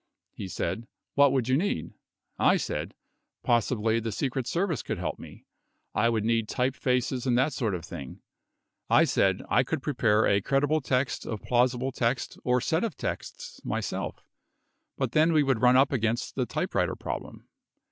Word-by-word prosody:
He 95 - -6
said: 115 +6 -3 0.3
"What 140 -1 +5
would 130 -3 0
you 130 - +3
need?" 160 - -2 0.5
I - - +5
said, - - -4 0.5
"Possi 120 0 +2
bly 110 +1 +2
the 115 0 -3
Secret 130 +2 -2
Service 170 -4 0
could - - -4
help - - -3
me. - - -12 0.5
I 115 +2 +3
would 110 -2 0
need 115 -1 +1
type 125 +2 0
faces 125 0 0
and 120 -1 +3
that 135 +4 +2
sort 110 -7 -1
of 85 -1 -6
thing." 70 -7 -8 0.7
I - - +6
said, 95 -1 +2
"I 125 - +4
could 130 +1 -3
prepare 110 -6 +2
a 100 0 +3
cred 135 +7 +1
ible 155 0 +1
text 130 +1 -1
of 110 -2 -5
plausible 125 +1 +1
text 125 0 -1
or 125 0 +2
set 160 - 0
of 230 - -3
texts 485 0 -6
myself, - - -3 0.7
but - - -1
then 160 +2 +4
we 155 -2 +4
would 135 -5 +1
run 125 0 +6
up 135 +2 +4
against 115 -3 -1
the - - -1
typewriter - - -1
problem." - - -6
125 Hz, 180 wpm, -28 LUFS, 115-135 Hz, 0.7 s, I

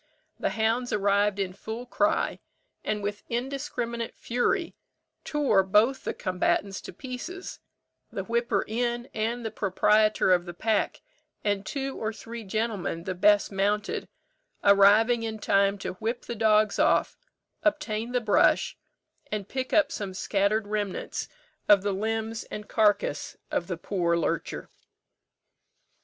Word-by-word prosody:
The - - 0
hounds 225 +4 0
arrived 205 0 +2
in 190 -2 -2
full 220 +5 -6
cry, 310 +5 +1 0.4
and 210 -1 -2
with 205 0 -3
indiscriminate 240 -2 -3
fury 330 +9 0 0.5
tore 280 -10 +3
both 210 +8 +2
the - - -1
combatants 190 +1 0
to - - -8
pieces; 280 +9 -7 0.5
the 195 - -3
whipper 235 -1 0
in, 240 +2 -1
and 230 +2 -2
the 220 - -2
proprietor 210 +1 +3
of 175 -1 +3
the 175 -1 -8
pack, 220 +3 0 0.4
and 205 -1 0
two 270 +5 -3
or 220 0 -2
three 230 +1 -8
gentlemen 205 -5 -2
the 185 - -3
best 205 +3 +4
mounted, 205 +2 0 0.6
arriving 205 +4 +6
in 220 -1 -3
time 200 -1 +2
to 190 - -4
whip 225 +5 -3
the - - -4
dogs 215 -1 +3
off, - - +3 0.5
obtain 245 -7 0
the 250 - +2
brush, 215 -3 +3 0.6
and 210 -2 -3
pick 260 -1 -3
up 310 -3 +4
some 195 -3 -4
scattered 205 +2 +1
remnants 205 -2 -3 0.4
of 200 -2 +7
the 200 -1 0
limbs 225 +2 -2
and 210 0 -7
carcase 210 -8 +1
of 175 - -1
the 180 - -3
poor 170 -1 0
lurcher. 170 - -2
215 Hz, 135 wpm, -27 LUFS, 200-235 Hz, 0.6 s, of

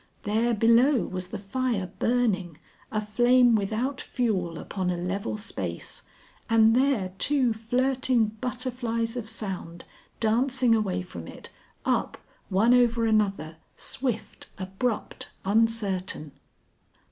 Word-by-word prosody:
There 225 +3 +1
below 235 +5 +4
was 185 -1 -5
the 215 - -5
fire 200 -2 -2
burning, 200 -9 +1 0.3
a 215 - 0
flame 240 +3 +4
without 225 +6 -1
fuel 190 - -1
upon 185 0 -3
a 180 - -1
level 195 +5 -3
space, 90 - -5 0.5
and 225 0 +5
there 250 -8 +2
two 265 -5 +2
flirting 245 +1 +1 0.2
butterflies 245 -2 -2
of 230 -3 -4
sound, 190 -6 -6 0.3
dancing 245 +2 +2
away 190 -5 0
from 85 - -9
it, - - -11 0.3
up, - - 0 0.3
one 215 +6 +4
over 240 -2 +4
another, 200 -8 +1 0.2
swift, 240 -4 -3
abrupt, 195 +5 -3 0.2
uncertain. 200 -7 0
225 Hz, 110 wpm, -27 LUFS, 195-245 Hz, 0.5 s, and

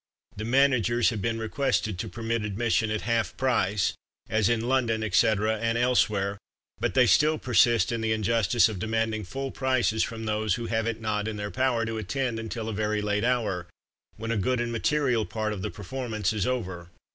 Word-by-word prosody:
THE 105 - -5
MANAGERS 120 -2 +3
Have 110 -3 -4
been 115 +2 -1
requested 110 -4 -1
to - - -3
permit 115 -1 -2
admission 110 +1 0
at 110 -1 -1
HALF 115 -1 -1
PRICE, 105 -7 +1 0.4
As 110 -1 +2
in 115 -1 +1
London, 120 -3 +1
etc. 110 0 +2
(and 115 +1 0
elsewhere), 105 -5 +1 0.4
but - - -1
they 130 -2 +6
still 155 +6 +4
persist 120 -6 +3
in 115 -1 -2
the 110 0 0
injustice 110 0 +3
of 110 -4 -5
demanding 110 +1 -1
FULL 135 +8 -5
PRICES, 130 -4 +1
from 115 -1 -3
those 105 -2 0
who 120 - -5
have 115 0 -1
it 115 -1 -3
not 105 -1 -1
in 110 - -3
their 105 0 -4
power 125 -3 +1
to 115 0 -3
attend 120 +2 -2
until 115 0 -5
a 110 - -3
very 105 0 -1
late 105 0 0
hour, 110 -8 0 0.5
when 115 +2 -4
a 115 - 0
good 125 +5 0
and 120 0 -1
material 125 -1 +1
part 110 0 -3
of 100 - -6
the - - -3
performance 110 -2 -3
is 105 -3 -1
over! 95 -9 -3
110 Hz, 190 wpm, -27 LUFS, 105-120 Hz, 0.5 s, they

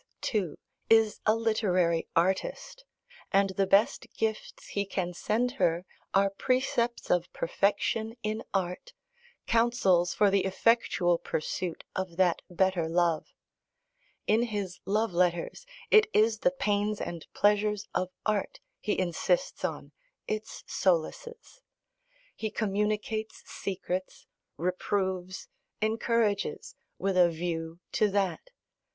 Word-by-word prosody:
too, 190 -9 -1 0.3
is 225 -1 +4
a 215 - +5
literary 185 -7 +1
artist, - - 0 0.5
and 195 0 +3
the 195 +1 +1
best 200 +3 +3
gifts 220 -1 -3
he 200 - -1
can 185 -3 -3
send 230 +7 0
her 175 0 +2 0.3
are 195 0 +3
precepts 245 +2 0
of 175 0 +1
perfection 215 +4 0
in 215 +1 -2
art, 190 - -2 0.5
counsels 230 -7 +3
for 205 -2 +3
the 195 -1 +3
effectual 190 -3 +2
pursuit 170 +2 -3
of 185 -3 -3
that 180 -3 +3
better 180 -2 +1
love. 170 -1 +1 1.0
In 220 +2 +3
his 205 -6 -3
love 210 0 +1
letters 175 - 0 0.2
it 430 -1 +7
is 220 0 +4
the - - +4
pains 210 -5 0
and 170 -2 -5
pleasures 210 0 +2
of 185 - 0 0.2
art 215 -2 -1 0.2
he 210 - -1
insists - - 0
on, - - -3 0.4
its 215 0 -4
solaces: 450 - -1 0.7
he 220 - -3
communicates 215 +1 -2
secrets, 185 -1 -4 0.3
reproves, 185 +1 -2 0.3
encourages, 225 - 0 0.2
with 195 -1 -1
a 180 -1 +6
view 165 0 -4
to 215 - +2
that. 200 - -1
200 Hz, 115 wpm, -29 LUFS, 180-220 Hz, 1.0 s, it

